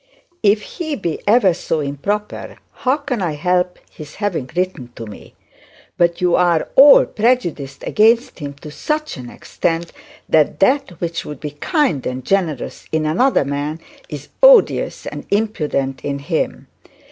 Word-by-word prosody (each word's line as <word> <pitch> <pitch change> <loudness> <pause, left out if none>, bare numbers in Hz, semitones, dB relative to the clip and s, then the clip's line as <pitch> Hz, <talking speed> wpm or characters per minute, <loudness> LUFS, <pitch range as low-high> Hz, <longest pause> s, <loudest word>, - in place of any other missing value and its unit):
'If 210 0 +3
he 315 -4 -5
be 170 - -4
ever 205 -4 +5
so 165 -1 -2
improper, 150 +9 -4 0.2
how 260 +2 0
can 280 -7 -4
I 170 -4 -1
help 180 +3 0
his 150 -2 -11
having 180 -11 -3
written 180 -9 -2
to 115 - -7
me? 105 - -12 0.6
But 170 -1 +1
you 180 -1 +2
are 175 -3 +2
all 280 +2 +8
prejudiced 180 - -1
against 230 +1 +2
him 140 -2 -6
to 150 - -8
such 305 - -3
an 125 -2 -8
extent, 165 +5 -3 0.4
that 155 -2 +2
that 225 - +1
which 170 -1 -3
would 150 -3 -8
be 150 - -5
kind 165 - 0
and 125 0 -5
generous 175 -9 -2
in 160 -1 0
another 180 - +2
man 145 +3 -3 0.3
is 145 -2 -8
odious - - +5
and - - -7
impudent 150 -11 -1
in 140 -1 -2
him. 155 +3 -3
170 Hz, 150 wpm, -19 LUFS, 145-215 Hz, 0.6 s, all